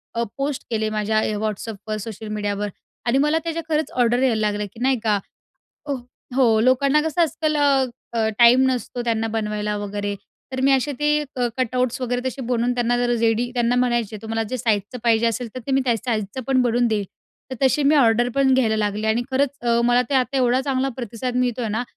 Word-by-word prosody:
अ, 235 - +1
post 275 0 -2
केले 220 -2 -1
माझ्या 215 0 0
अ, 215 - -1
WhatsAppवर 215 0 -4
सोशल 220 +1 -7
मीडियावर 205 -1 -2 0.4
आणि 240 +2 +2
मला 300 +2 +2
त्या 330 - -2 0.2
खरंच 310 0 0
ऑर्डर 245 0 +2
यायला 230 -4 +2
लागले, 210 -1 -1
की 220 - -16
नाही 260 -1 +2
का? 210 -2 +2 0.7
हो, 285 - 0 0.4
हो. 235 -5 +4
लोकांना 270 +5 +3
कसं 320 +2 -1
आजकाल 315 -1 0
अ, 260 -5 +1
टाईम 240 +2 +7
नसतो 245 -1 -3
त्यांना 225 -1 0
बनवायला 210 -1 -2
वगैरे. 205 0 -3 0.4
तर 260 - -3
मी 270 +1 +4
असे 270 +2 +1
ते 295 0 +2 0.3
कटआउट्स 255 +1 0
वगैरे 245 -1 -1
तसे 260 +1 -4
बनवून 245 0 +1
त्यांना 245 0 +1
जर 245 0 +1
रेडी 230 +1 +1
त्यांना 240 0 +1
म्हणायचे 240 -3 0
तुम्हाला 225 0 -2
जे 255 - -2
साइजचं 215 0 -1
पाहिजे 230 0 +3
असेल, 230 +1 -1
तर 255 - -5
ते 275 - -1
मी 270 - +3
त्या 240 -3 +2
साइजचं 220 0 -3
पण 265 -1 +3
बनवून 240 0 +2
देईन. 215 -2 0 0.5
तर 260 - -4
तशी 270 +2 +3
मी 285 +2 +4
ऑर्डर 240 -2 +4
पण 275 -1 +3
घ्यायला 230 -4 +2
लागले 210 0 -1
आणि 225 +2 +1
खरंच 270 +1 +2
अ, 235 -1 +2
मला 245 +1 +4
ते - - +1
आता 260 +1 +1
एवढा 255 0 +3
चांगला 270 -1 0
प्रतिसाद 245 +1 -4
मिळतो 250 -1 0
आहे 225 - -2
ना, 220 +3 -1
240 Hz, 200 wpm, -22 LUFS, 220-260 Hz, 0.7 s, टाईम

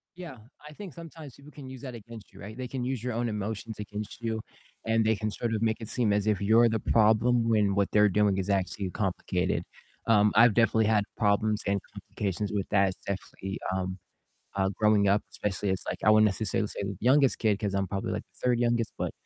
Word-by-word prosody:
Yeah, 170 -7 -9 0.3
I 150 - -11
think 190 0 -9
sometimes 160 -4 -11
people 140 +2 -15
can 140 -3 -10
use 130 -1 -9
that 130 -3 -7
against 115 -1 -12
you, 100 - -13
right? 110 +4 -9
They 130 - -4
can 125 0 -4
use 130 -2 -2
your 125 -1 -2
own 120 +1 -1
emotions 105 +1 -5
against 105 +2 -7
you, 110 -1 -2 0.4
and 115 0 +2
they 110 0 +3
can 105 +1 -3
sort 115 +2 -2
of 110 - -1
make 110 -1 +1
it 110 - -7
seem 115 -3 0
as 105 +1 +1
if 105 -2 +1
you're 110 +4 +5
the 110 -1 0
problem 115 +2 +3
when 105 -3 +2
what 100 -1 +1
they're 105 0 +5
doing 100 0 +2
is 95 +1 -2
actually 95 0 -1
complicated, 90 -1 -1 0.4
um, 105 -2 +4
I've 115 0 +6
definitely 110 -2 +3
had 105 -2 +3
problems 105 0 +1
and 100 0 +1
complications 100 0 -4
with 100 -2 -2
that, 100 -1 +4
it's 95 - -7
definitely, 95 0 -5
um, 95 0 -3 0.6
uh, 95 -1 +1
growing 105 -2 +4
up 100 +2 +3
especially, 105 0 -2
it's 95 0 -1
like - - -3
I 105 - +5
wouldn't 110 0 +6
necessarily 105 +1 0
say - - -5
the 100 -1 -4
youngest 135 +3 +4
kid 105 -3 +1
'cause 100 -2 -2
I'm 100 0 0
probably 95 +1 -3
like - - -3
the - - -21
third 125 -1 +3
youngest, 120 -1 0
but, - - -3
110 Hz, 225 wpm, -28 LUFS, 100-115 Hz, 0.6 s, I've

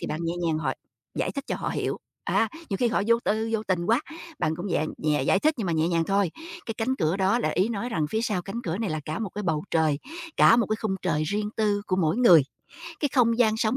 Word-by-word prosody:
thì - - -4
bạn 155 - -3
nhẹ 165 +1 -1
nhàng 155 -1 +1
họ 135 -4 -1 0.4
giải - - -1
thích 280 - -5
cho - - -1
họ - - -3
hiểu, - - -2 0.3
á, 225 - +2 0.2
nhiều 195 - 0
khi 245 - +2
họ 225 -3 +1
vô 230 0 +5
tư 220 +2 0
vô 220 -1 0
tình 175 -1 0
quá, 230 +4 +3 0.4
bạn 155 0 0
cũng 180 +3 -5
nhẹ 160 -3 +1
nhẹ 150 -3 +1
giải 190 - +3
thích 310 0 +3
nhưng 210 - -2
mà 170 - 0
nhẹ 160 +1 +1
nhàng 165 -1 +1
thôi. 195 -2 +1 0.4
Cái 225 - -3
cánh 260 +4 0
cửa 165 0 +1
đó 195 +4 +2
là - - 0
ý 190 +5 +1
nói 235 +1 -3
rằng 160 -10 -1
phía 220 +1 0
sau 200 -6 -1
cánh 220 +6 -5
cửa 175 +3 -2
này 220 -6 -2
là 155 - -2
cả 155 +5 -3
một 215 -5 -3
cái 210 - -5
bầu 160 -4 0
trời, 155 -3 +2 0.4
cả 230 - +7
một 230 -4 +2
cái 215 - -1
khung 190 -3 -1
trời 160 -4 +1
riêng 210 +4 -1
tư 205 -2 +1
của 185 - 0
mỗi 165 +1 +1
người, 180 - +7 0.6
cái 290 - +1
không 230 -3 +3
gian 220 -3 +4
sống 220 +3 +1
200 Hz, 275 wpm, -26 LUFS, 165-225 Hz, 0.6 s, cả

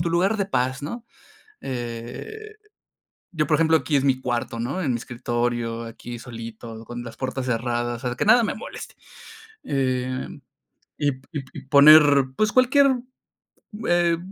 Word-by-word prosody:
tu 170 0 0
lugar 185 +6 +2
de 200 - 0
paz, 130 -6 -1
¿no? 230 +11 -6 0.6
Eh, 125 - -6 0.8
yo, 155 -3 0
por 150 - +3
ejemplo, 160 +1 +3
aquí 155 -1 -2
es 135 - 0
mi 130 -1 +2
cuarto, 120 -2 -2
¿no? 135 +11 -2
En 140 - 0
mi - - 0
escritorio, 120 -1 -2
aquí 120 +1 -8
solito, 115 -1 -9
con 120 +1 -7
las 115 -2 -10
puertas 130 0 -3
cerradas, 120 0 -2
o - - -1
sea, 125 - -3
que - - -1
nada 230 +2 +6
me 210 - -1
moleste. 215 - -9 0.7
Em, 130 -2 -2 0.6
y 145 -1 +1
p 130 0 -15
y 150 - -3
p 130 - -19
y - - -8
poner, 150 +3 +9 0.3
pues, 215 0 +1
cualquier, 265 +1 +4 0.9
eh, 175 -1 +3
130 Hz, 165 wpm, -23 LUFS, 120-165 Hz, 0.9 s, poner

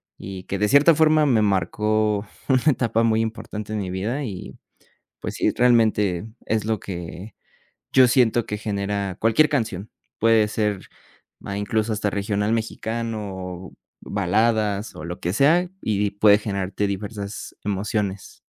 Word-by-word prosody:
y 95 -1 -8
que 100 - -4
de 105 - +2
cierta 145 +7 +6
forma 155 0 +4
me 120 -6 +3
marcó 105 +2 +1 0.2
una 130 -2 +3
etapa 115 -5 +2
muy 115 -1 +2
importante 110 -1 -5
en 105 - -1
mi 95 -2 -3
vida 110 +10 -2
y 95 -6 -7 0.7
pues - - -5
sí, - - +1
realmente 110 -6 +2 0.2
es 110 -2 0
lo 110 -2 -1
que 90 +2 -7 0.6
yo 130 -2 +6
siento 120 -2 +3
que 105 -2 -4
genera 100 -2 -2
cualquier 115 +8 +4
canción, 110 - -2 0.3
puede 110 -1 +4
ser 105 -3 -2 0.5
ma 100 0 -6
incluso 110 +2 -1
hasta 105 -1 -1
regional 105 +1 -1
mexicano 110 -2 -3
o 90 0 -7 0.3
baladas 105 +2 0
o 80 - -8
lo 85 +1 -6
que 90 - -1
sea 165 - +3
y 105 -1 0
puede 105 0 +5
generarte 100 -1 -2
diversas 100 +1 -6
emociones. 100 -1 -3
105 Hz, 145 wpm, -23 LUFS, 100-115 Hz, 0.7 s, cierta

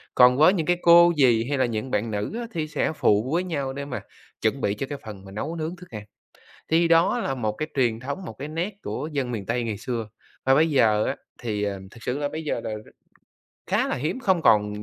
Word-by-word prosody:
Còn 125 0 +6
với 160 +6 +6
những 165 -5 -1
cái 175 0 +2
cô, 170 0 +7
dì 120 -5 +4
hay 140 - 0
là 130 - +3
những 115 +2 -3
bạn 110 +2 0
nữ 105 - -3
á, 235 - -4
thì 155 -3 -2
sẽ 150 0 -1
phụ 110 +3 +2
với 175 +2 +2
nhau 140 -7 -3
để 140 +1 -5
mà 135 - -5 0.4
chuẩn - - 0
bị 100 - +1
cho 135 +6 -4
cái 145 - -4
phần 100 -3 -9
mà 95 - -11
nấu 150 +11 -4
nướng 165 +1 -4
thức 180 0 -14
ăn, 105 -2 -7 0.7
thì 165 +1 +4
đó 165 +8 +4
là 135 - -2
một 110 -4 -1
cái 155 +8 -4
truyền 120 -4 +1
thống, 140 +9 -5
một - - -7
cái 140 - -4
nét 170 +6 -3
của 130 +9 -4
dân 135 -4 -2
miền 105 -5 -4
Tây 120 +1 -1
ngày 110 -3 -3
xưa. 115 0 -4 0.4
Và 135 - +5
bây 160 +3 +4
giờ 110 -7 +3
á, 135 - -1 0.3
thì, 105 -3 -2
à, 100 -1 -2
thực 115 -1 -14
sự 125 +4 -2
là 145 -1 -1
bây 160 0 -5
giờ 145 - -2
là - - -3 1.0
khá - - +1
là - - -1
hiếm, 155 - -2
không 190 -8 +2
còn 105 -3 +3
135 Hz, 250 wpm, -25 LUFS, 110-160 Hz, 1.0 s, cô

